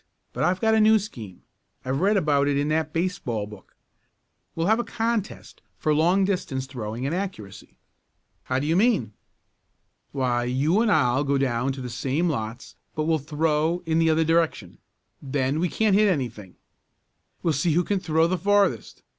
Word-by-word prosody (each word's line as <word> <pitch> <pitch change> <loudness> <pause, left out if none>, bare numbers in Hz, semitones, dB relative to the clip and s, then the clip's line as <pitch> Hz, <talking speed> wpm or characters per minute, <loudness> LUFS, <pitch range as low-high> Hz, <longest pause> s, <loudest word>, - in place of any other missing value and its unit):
But - - -2
I've 185 +1 +1
got 220 +1 +2
a 220 - +4
new 220 +1 +6
scheme. 115 - -8 0.4
I 130 - -2
read 190 +10 +2
about 145 -5 +2
it 140 -1 +1
in 145 +1 0
that 155 0 0
baseball 165 - -2
book. 105 -2 -14 0.8
We'll 165 - -1
have 220 +4 +3
a - - 0
contest 225 -3 -3 0.2
for 155 - +1
long 175 +6 +3
distance 175 -9 -2
throwing 120 -2 -5
and 140 - -1
accuracy." 110 - -6 0.7
"How 130 - -1
do 135 - -1
you 160 +2 +1
mean?" 195 - +2 1.0
"Why 125 -3 0
you 145 - +1
and 230 -2 +2
I'll 125 -1 +2
go 140 -1 +1
down 130 0 0
in 135 - -7
the - - -4
same 135 +7 -1
lots 115 -5 -4 0.2
but 155 - -1
we'll 160 0 +1
throw 155 +3 0
in 160 0 +1
the 165 -1 +3
other 160 +1 +3
direction. 165 0 0 0.4
Then 140 +1 -1
we 175 +1 0
can't 215 +1 +2
hit 210 0 +4
anything. 120 - -3 0.9
We'll 165 - +2
see 150 +3 +1
who 175 +3 +2
can 200 +2 -1
throw 160 -2 +2
the 180 +1 -1
farthest. 200 - +1
155 Hz, 180 wpm, -24 LUFS, 130-180 Hz, 1.0 s, new